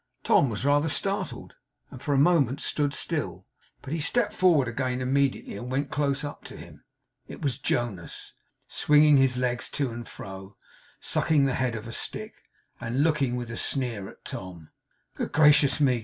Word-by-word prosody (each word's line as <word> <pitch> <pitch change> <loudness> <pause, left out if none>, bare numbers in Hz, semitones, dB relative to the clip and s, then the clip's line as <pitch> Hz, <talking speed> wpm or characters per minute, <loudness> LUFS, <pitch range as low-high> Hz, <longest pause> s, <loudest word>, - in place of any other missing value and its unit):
Tom 140 - +4
was 110 +3 -4
rather 145 +2 +3
startled, 195 +6 -2 0.4
and 130 - -10
for 145 - -2
a 140 - +3
moment 140 -3 +3
stood 145 -1 -1
still, - - -4 0.4
but 135 - -5
he 165 - -1
stepped 210 +7 +1
forward 170 - +4
again 125 +2 -2
immediately, 135 -1 0
and 120 +5 -6
went 140 +2 -1
close 140 -1 0
up 145 0 -6
to - - -9
him. - - -13 0.4
It - - -9
was 135 -4 -1
Jonas; 110 -8 -3 0.3
swinging 150 -1 +5
his 135 -2 +3
legs 125 -1 -1
to 140 -4 -2
and 120 0 -8
fro, 95 +1 -10 0.4
sucking 150 -3 +2
the 135 - +1
head 125 -2 -1
of 110 +1 -6
a - - -6
stick, - - -5 0.5
and 125 +5 0
looking 145 -6 +1
with 120 -1 -4
a - - -5
sneer 115 -7 -2
at - - -17
Tom. 85 -4 -8 0.4
'Good - - -4
gracious 150 -1 +5
me! 130 -5 +3
135 Hz, 175 wpm, -27 LUFS, 120-145 Hz, 0.5 s, swinging